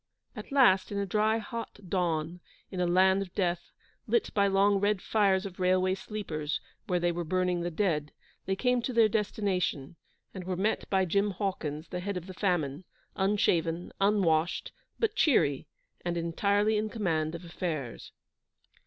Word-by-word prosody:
At - - -9
last, 245 -10 +4
in 200 - -3
a 200 - 0
dry, 215 +3 +2
hot 230 +1 -6
dawn, 170 -2 -1 0.3
in 185 - -4
a 180 - +2
land 190 +2 +4
of 185 -3 -7
death, 175 -3 -1 0.4
lit 470 - +1
by 200 -1 +3
long 200 +1 +3
red 205 0 +1
fires 195 -1 +2
of 190 -2 -8
railway 185 0 +2
sleepers, 170 -7 -4 0.3
where 180 -3 +1
they 175 0 +1
were 170 0 -3
burning 180 +1 0
the 175 - -1
dead, 160 -5 -1 0.4
they 190 - +1
came 250 +4 +1
to 255 - -3
their 230 -2 +5
destination, 195 -8 -1 0.4
and 185 -2 -7
were 185 -1 -2
met 210 +4 -1
by 190 -1 +2
Jim 200 +4 +1
Hawkins, 175 -6 -3
the 180 - -4
Head 195 +1 -3
of 175 - -6
the 185 - -8
Famine, 175 -5 -1 0.3
unshaven, 175 -4 +1
unwashed, 180 -5 +2 0.3
but 445 -2 0
cheery, 145 - +2 0.4
and 175 -1 -2
entirely 200 +6 +1
in 215 +1 -1
command 165 -8 -1
of 170 +1 -8
affairs. 160 -7 -5
185 Hz, 165 wpm, -29 LUFS, 170-205 Hz, 0.4 s, their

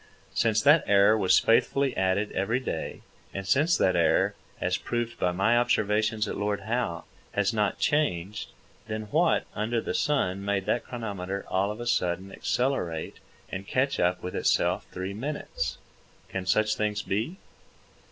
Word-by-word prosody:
Since 110 -1 +2
that 150 +1 +6
error 100 +1 +5
was 100 -4 +4
faithfully 135 +3 +2
added 95 +2 +1
every 105 +6 0
day, 105 -11 -4 0.3
and 95 0 -4
since 150 - +3
that 95 - +2
error, 85 -2 +3 0.3
as 90 0 0
proved 120 +5 -3
by 90 - +2
my 100 +6 +2
observations 110 -2 +1
at - - -4
Lord 100 0 -1
Howe, 110 -5 -2 0.3
has 105 +2 +1
not 105 -3 0
changed, 105 - 0 0.4
then 110 -1 -3
what 165 +1 +3
under 115 +2 -1
the - - -3
sun 100 -10 0
made 100 -1 -1
that 120 - 0
chronometer 100 -5 -5
all 95 +2 +1
of 105 +2 -5
a 120 - -5
sudden 95 -4 0
accelerate 95 -14 -1 0.3
and 95 +1 -5
catch 135 +2 0
up 90 0 +1
with 90 - -5
itself - - +1
three 95 +2 -4
minutes? 110 - -4 0.5
Can 95 -1 -4
such 110 +3 +3
things 105 0 -1
be? 110 - -2
105 Hz, 155 wpm, -27 LUFS, 95-120 Hz, 0.5 s, that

